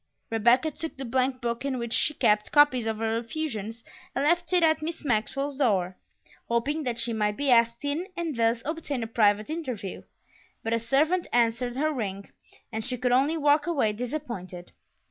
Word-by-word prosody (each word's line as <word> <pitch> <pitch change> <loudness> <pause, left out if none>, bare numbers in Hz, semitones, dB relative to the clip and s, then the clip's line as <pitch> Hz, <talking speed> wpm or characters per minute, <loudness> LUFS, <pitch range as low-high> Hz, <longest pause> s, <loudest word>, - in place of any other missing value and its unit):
Rebecca 240 +7 +3
took 320 +1 -6
the 270 - -5
blank 255 +2 0
book 235 +1 -2
in 275 -2 -1
which 235 -1 -4
she 300 - +1
kept 210 0 +2
copies 275 -6 +4
of 220 -1 -1
her 225 0 0
effusions 230 -4 -5 0.3
and 275 - 0
left 345 +4 +2
it 360 -2 +4
at 315 -1 +3
Miss 320 0 -5
Maxwell's 270 +4 -1
door, 190 -9 +1 0.5
hoping 260 +7 0
that 240 -2 -1
she 235 -1 +1
might 210 -1 0
be 285 -2 +1
asked 235 +2 +3
in 305 +6 -1
and 330 -4 -2
thus 230 0 +1
obtain 295 -5 -3
a - - -4
private 215 +1 +2
interview; 255 - -5 0.6
but 225 - -1
a 230 - +2
servant 300 +10 +1
answered 240 +1 +1
her 305 +3 0
ring, 200 -6 -4 0.4
and 220 0 -3
she 250 +2 -2
could 250 +1 0
only 275 +6 +3
walk 295 +1 +3
away, 270 -11 +1
disappointed. 210 -8 -6
245 Hz, 185 wpm, -27 LUFS, 225-290 Hz, 0.6 s, copies